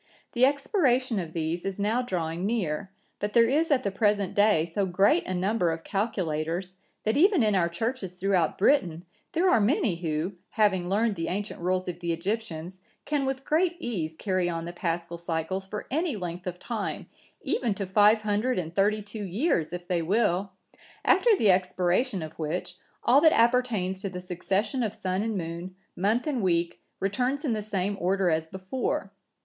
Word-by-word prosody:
The 245 +1 +4
expiration 265 - +1
of 165 -3 -5
these 165 +1 -2
is 195 -1 -3
now 215 +5 +1
drawing 175 -7 -3
near, 195 -4 -1 0.3
but 205 +1 -3
there 230 -1 +6
is 305 +6 +2
at 270 -4 +3
the 200 - -1
present 205 -1 +1
day 205 -6 +4
so 190 +4 -1
great 195 - +3
a 185 - -2
number 185 0 +1
of 165 0 -5
calculators, 180 -4 -2 0.3
that 220 +4 +1
even 365 - +5
in 210 -1 +2
our 175 -3 +2
Churches 195 0 -3
throughout 185 -3 +1
Britain, 180 - +2 0.3
there 345 +3 +2
are 235 - +4
many 205 - +2
who, 165 +2 -2 0.2
having 190 -5 +1
learned 215 +3 +2
the 165 - -2
ancient 200 +4 -3
rules 185 +1 0
of 175 -1 -4
the 170 -1 -2
Egyptians, 180 -1 -4 0.3
can 290 -3 0
with 270 0 -3
great 345 +3 +2
ease 180 - -3
carry 185 -2 0
on 165 -1 -3
the 175 - -6
Paschal 170 0 -3
cycles 170 +3 -3
for 210 +2 -5
any 315 -1 0
length 180 -2 -5
of 180 -1 -4
time, 220 +1 -4 0.4
even 230 -6 0
to 195 - -3
five 210 +3 +4
hundred 215 +5 0
and 165 -2 -3
thirty 210 +3 +2
two 210 +1 -7
years,(978) 190 - 0
if 175 - -28
they 175 -2 0
will; 195 +1 +1 0.5
after 485 - +4
the 210 - +5
expiration 185 +3 +1
of 155 +1 -9
which, 175 +3 -3 0.3
all 265 +4 +5
that 315 -1 +6
appertains 230 -6 +2
to 200 - -3
the 180 -1 -6
succession 190 - -1
of 220 -4 -2
sun 185 +1 -2
and 220 -1 -1
moon, 170 +2 -5 0.2
month 215 +6 +1
and 280 -6 -1
week, 170 -2 0 0.2
returns 250 - -1
in 250 - +1
the 215 - -2
same 200 -1 -2
order 185 0 +2
as 160 0 0
before. 190 +9 -3
195 Hz, 185 wpm, -27 LUFS, 175-230 Hz, 0.5 s, there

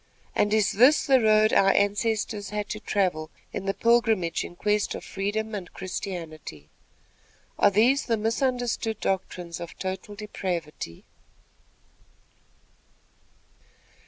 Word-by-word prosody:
and 205 - +2
is 215 -1 +3
this 255 +8 +5
the 265 -2 +5
road 215 0 +4
our 195 - +5
ancestors 205 0 0
had 210 0 -3
to 215 - -5
travel 180 -7 -1 0.2
in 195 - -4
their 195 - 0
pilgrimage 225 -6 +2
in 175 - -9
quest 210 +2 0
of - - -7
freedom 215 +3 -3
and 190 -4 -6
Christianity? 165 - -6 0.9
Are - - +6
these 235 +8 +3
the 230 -2 +2
misunderstood 235 0 -1
doctrines 180 -3 -3
of 170 -1 -8
total 190 +2 -5
depravity?" 175 - -5
205 Hz, 115 wpm, -26 LUFS, 185-220 Hz, 0.9 s, Are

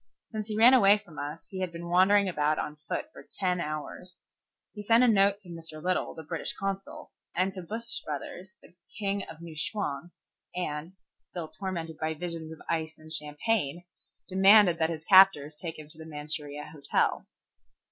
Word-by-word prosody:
Since 215 -2 -4
he 215 -1 -3
ran 235 +4 +8
away 205 -5 +7
from 195 -7 -12
us 145 +3 -6
he 190 - -5
had 185 -2 -2
been 170 0 -7
wandering 190 +3 +5
about 150 -3 +1
on 150 - -3
foot 305 - -3
for - - -14
ten 180 -2 +1
hours. 155 +4 -6 0.6
He 210 - -7
sent 230 +4 +5
a - - +6
note 200 -2 +4
to 185 - -10
Mr. 165 -2 -8
Little, 180 +3 -1
the 160 - -8
British 160 +1 -4
Consul, 195 0 -5 0.2
and 185 +2 +1
to 190 - -6
Bush 225 +6 0
Brothers, 180 +6 -7
the - - -18 0.2
kings 200 -2 -1
of 165 0 -11
New 170 -2 -9
Chwang, 170 -2 -3 0.5
and, 160 -1 -4 0.4
still 170 -3 -6
tormented 170 -5 -5
by 160 0 -1
visions 165 -1 -6
of 160 - -8
ice 160 -1 -2
and 155 0 -11
champagne, 155 +2 -1 0.4
demanded 190 -2 +6
that 160 0 +3
his 160 -2 -4
captors 185 -7 +6
take 165 +1 -6
him 155 -1 -10
to 155 +1 -16
the 160 - -9
Manchuria 150 -1 -5
Hotel. 140 -2 0
170 Hz, 180 wpm, -29 LUFS, 155-195 Hz, 0.6 s, ran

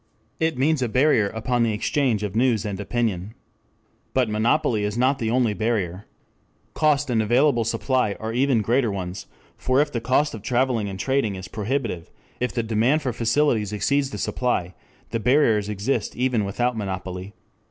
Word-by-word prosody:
It 160 -3 0
means 145 +2 +2
a 125 - 0
barrier 125 -4 +3
upon 115 +3 -1
the 115 -2 +2
exchange 115 0 0
of 105 -1 -4
news 115 -3 +2
and 100 -2 -4
opinion. 105 -2 -2 0.8
But 125 -4 +2
monopoly 110 0 +1
is 105 +2 -2
not 130 +3 +2
the 115 - -1
only 120 -2 +2
barrier. 105 -4 -2 0.7
Cost 145 -3 +2
and 115 -2 +2
available 120 +3 +3
supply 115 0 0
are 110 0 -4
even 125 -2 +2
greater 120 +1 +1
ones, 95 -1 -5 0.3
for 130 +1 +2
if 145 0 +2
the 115 - -3
cost 130 +5 +1
of 110 - -7
travelling 120 -2 0
or 95 - -6
trading 120 -2 0
is 95 +1 -7
prohibitive, 110 -5 -3 0.3
if 125 - -1
the 120 - -1
demand 115 +7 +1
for 130 -3 -1
facilities 115 -2 +1
exceeds 135 +6 0
the - - -6
supply, 95 -8 -1 0.4
the 115 - -1
barriers 115 -4 +3
exist 105 +6 -2
even 125 -4 +1
without 120 +5 -1
monopoly. 95 -2 -5
115 Hz, 170 wpm, -23 LUFS, 105-130 Hz, 0.8 s, barrier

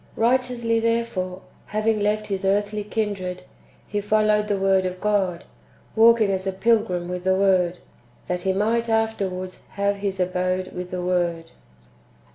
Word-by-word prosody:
"^ - - -9
Kighteously, 240 -1 +1
therefore, 225 -6 -1 0.2
having 215 +1 0
left 210 +1 0
his 195 -1 -3
earthly 205 +2 0
kindred, 200 -4 -3 0.4
he 205 0 -2
followed 210 0 +2
the 205 -1 0
Word 190 -1 +3
of 185 0 -4
God, 190 -4 0 0.5
walking 225 -2 +5
as 190 0 -2
a - - +1
pilgrim 190 -3 +1
with 180 0 -4
the 190 0 +3
Word, 185 -2 +2 0.5
that 180 0 -2
he 190 - +1
might 225 +4 0
[afterwards] 195 -5 -2
have 200 0 0
his 195 -1 -3
abode 185 0 -1
with 180 0 -5
the 180 -1 -4
Word. 175 -2 -1
195 Hz, 150 wpm, -23 LUFS, 185-215 Hz, 0.5 s, walking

